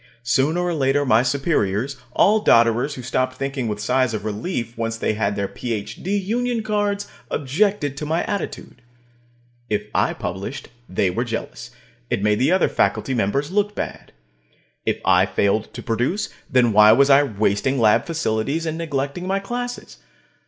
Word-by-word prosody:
Sooner 140 +7 +1
or 175 -1 0
later 145 -1 +1
my 115 -3 +4
superiors, 130 - 0 0.2
all 215 +2 +4
dodderers 115 +5 +4
who 125 - -8
stopped 130 +1 -1
thinking 135 -2 -3
with 105 -1 -3
sighs 125 +2 +1
of 110 - -5
relief 115 - -3
once 115 0 -3
they 110 - 0
had 105 -1 -1
their 100 -1 -1
PhD 125 - -3
union 240 +2 -1
cards, 205 -1 -1 0.2
objected 145 +1 0
to 150 - -4
my 160 +2 0
attitude. 200 -10 -5 0.9
If 105 -1 0
I - - +2
published, 95 +9 -5 0.2
they 95 0 +1
were 115 +7 -1
jealous; 115 -2 -5 0.4
it 100 - -1
made 105 0 +2
the 135 +6 +3
other 185 0 +3
faculty 135 - 0
members 130 - 0
look 205 +1 0
bad. - - -6 0.8
If - - +1
I - - +4
failed 100 +2 0
to - - -7
produce, 125 - -1 0.2
then 125 -3 +3
why 105 +1 +8
was 140 +4 +4
I 135 +1 +7
wasting 110 +1 0
lab 110 - +3
facilities 155 -1 -1
and 160 0 -3
neglecting 145 +2 -3
my 195 +1 +1
classes? 245 +5 -5
135 Hz, 160 wpm, -22 LUFS, 110-165 Hz, 0.9 s, why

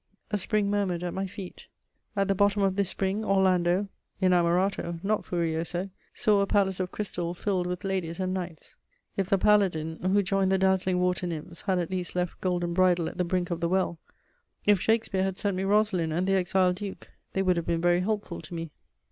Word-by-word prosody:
A 210 - +1
spring 210 +1 +1
murmured 190 -4 0
at 175 - -3
my 195 +1 -2
feet; 190 -1 -9 0.5
at 195 -1 +1
the 200 - +3
bottom 200 +1 +2
of 190 -1 +2
this 200 -2 +1
spring 195 +3 -1
Orlando 190 -1 +2 0.3
(Inamorato, 180 -1 +2
not 210 +2 0
Furioso) 170 +2 -2 0.2
saw 210 -2 +2
a 200 - +1
palace 190 -2 +2
of 185 -1 -2
crystal 175 -4 -3
filled 185 -1 -1
with 180 0 -4
ladies 185 -4 -2
and 185 0 -1
knights. 175 -4 -6 0.4
If 195 -1 -1
the 195 - +4
paladin, 180 -6 +2
who 195 +2 +2
joined 195 0 +1
the 190 - +4
dazzling 190 -1 +2
water 180 0 0
nymphs, 170 +1 -6
had 190 -1 +2
at 175 0 -2
least 180 -2 -3
left 180 -1 -2
Golden 175 -2 0
Bridle 180 -2 +3
at - - -12
the - - +3
brink 175 0 -1
of 170 - -1
the 170 0 0
well; 185 -2 0 0.7
if 205 -3 +4
Shakespeare 220 -4 +1
had 190 0 -1
sent 200 -2 -1
me 185 - -1
Rosalind 200 -5 +2
and 175 +4 0
the 195 - +2
Exiled 185 -1 +2
Duke, 200 -1 -7 0.2
they 195 - +1
would 185 -1 +3
have 170 - -2
been 170 - +1
very 175 0 +3
helpful 205 -2 -2
to 165 +2 -9
me. 165 -2 -5
185 Hz, 205 wpm, -27 LUFS, 175-195 Hz, 0.7 s, the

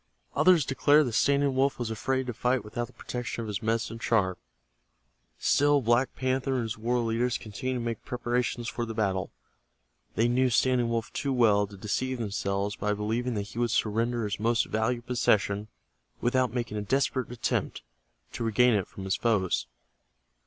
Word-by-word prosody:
Others 180 -6 +5
declared 145 +3 +4
that 120 - -3
Standing 140 +2 +3
Wolf 135 +1 +2
was 120 -2 -3
afraid 130 +4 -1
to 125 - -4
fight 125 +1 0
without 120 +3 -4
the 125 - -20
protection 120 -1 -5
of - - -6
his 100 -2 -3
medicine 115 0 -1
charm. 95 -6 +1 1.0
Still 145 0 +3
Black 120 +1 +1
Panther 130 +1 0
and 125 - 0
his 110 0 -3
war 120 +3 -1
leaders 115 +2 0
continued 120 +5 -4
to 120 - -4
make 115 -2 -3
preparations 120 0 -2
for 120 - -3
the 115 -1 -5
battle. 95 -4 0 0.9
They 115 - +3
knew 125 +2 +2
Standing 125 0 +2
Wolf 115 -1 -2
too 140 - -2
well 105 -5 +4
to 100 0 -12
deceive 130 +6 -2
themselves 100 -2 -2
by 105 +1 -1
believing 115 +4 -2
that 100 0 -3
he 115 - -7
would 120 -1 +1
surrender 115 +2 0
his 105 -2 -3
most 115 +2 +2
valued 120 +2 -1
possession 105 -4 +1 0.5
without 125 0 +1
making 120 -3 -3
a - - -1
desperate 130 +3 0
attempt 120 - -2 0.5
to - - -4
regain 115 +2 +4
it 100 -4 0
from 95 - -9
his 95 0 0
foes. 95 - +1
120 Hz, 175 wpm, -28 LUFS, 105-125 Hz, 1.0 s, Others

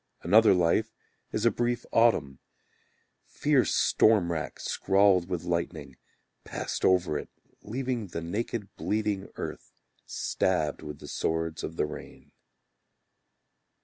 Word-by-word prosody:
Another 110 -2 +6
life 90 +6 +1 0.4
is 110 - -1
a 115 - +5
brief 120 0 -1
autumn, 75 - +3 0.9
Fierce - - +2
storm 105 -6 +4
rack 80 -2 -4
scrawled 95 -2 +2
with 90 -2 -2
lightning 85 -1 -3 0.5
Passed - - -5
over 90 -5 +3
it - - -9 0.3
Leaving 125 -1 -3
the 85 -2 -5
naked 105 +4 -4
bleeding 105 -2 -2
earth, - - -7 0.4
Stabbed 90 -6 -1
with 75 -1 -7
the - - -11
swords 80 0 -2
of 80 - -5
the - - +1
rain. 75 - -10
95 Hz, 115 wpm, -28 LUFS, 85-110 Hz, 0.9 s, Another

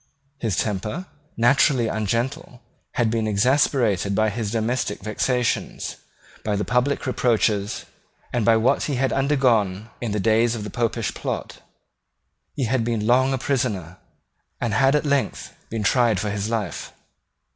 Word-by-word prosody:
His 110 -7 -1
temper, 105 - -2 0.3
naturally 120 +1 +4
ungentle, 115 +6 -2 0.3
had 115 -3 +1
been 115 -1 0
exasperated 110 -3 +2
by 110 +1 +2
his 110 -1 -3
domestic 110 -2 -1
vexations, 120 +3 -1 0.5
by 105 -1 0
the 105 - -1
public 125 +3 +1
reproaches, 110 -5 +1 0.5
and 120 - +1
by 115 +1 +5
what 110 +3 +2
he 145 - -1
had 130 +1 +1
undergone 120 -7 +1
in 120 -3 -2
the 105 - -1
days 115 +3 +3
of 110 - -5
the 105 - -6
Popish 115 -1 -1
plot. - - -5 0.9
He 140 - -1
had 120 0 +1
been 115 -2 -1
long 130 +3 +4
a 135 - +1
prisoner, 110 - -2 0.6
and 115 -3 -1
had 135 +5 +4
at 150 - +1
length 140 -2 -1 0.2
been 110 -1 -3
tried 115 -2 +3
for 105 +1 -2
his 105 +1 -2
life. 105 -8 -3
115 Hz, 145 wpm, -23 LUFS, 105-125 Hz, 0.9 s, by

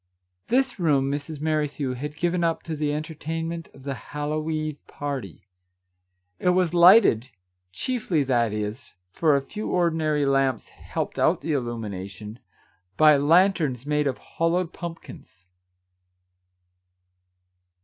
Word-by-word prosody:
This 260 -2 +1
room 140 -5 +2
Mrs. 145 +1 -5
Merrithew 150 -3 -1
had 150 +4 -6
given 175 +1 0
up 165 -1 0
to 160 - -4
the 150 -1 -1
enter 155 +2 -4
tainment 165 +2 -5
of - - -15
the 140 0 -3
Hallow 150 +3 -4
eve 155 -2 -3
party. 135 - -6 0.9
It 180 - +2
was 180 -2 +2
lighted 175 - +6 0.2
— 90 0 -53
chiefly, 195 - -1
that 120 -4 +1
is, 105 +5 -5 0.2
for 155 - +3
a 140 - 0
few 210 +9 -6
ordinary 160 -4 +1
lamps 135 -1 +1
helped - - -5
out - - +3
the 160 - -2
illumination 105 -4 -5 0.3
— 90 +1 -41
by 155 -1 +7
lan 170 +8 +5
terns 135 -8 -3
made 150 0 +1
of 130 - -1
hollowed 165 +1 -1
pumpkins. 165 - -10
150 Hz, 135 wpm, -25 LUFS, 130-165 Hz, 0.9 s, by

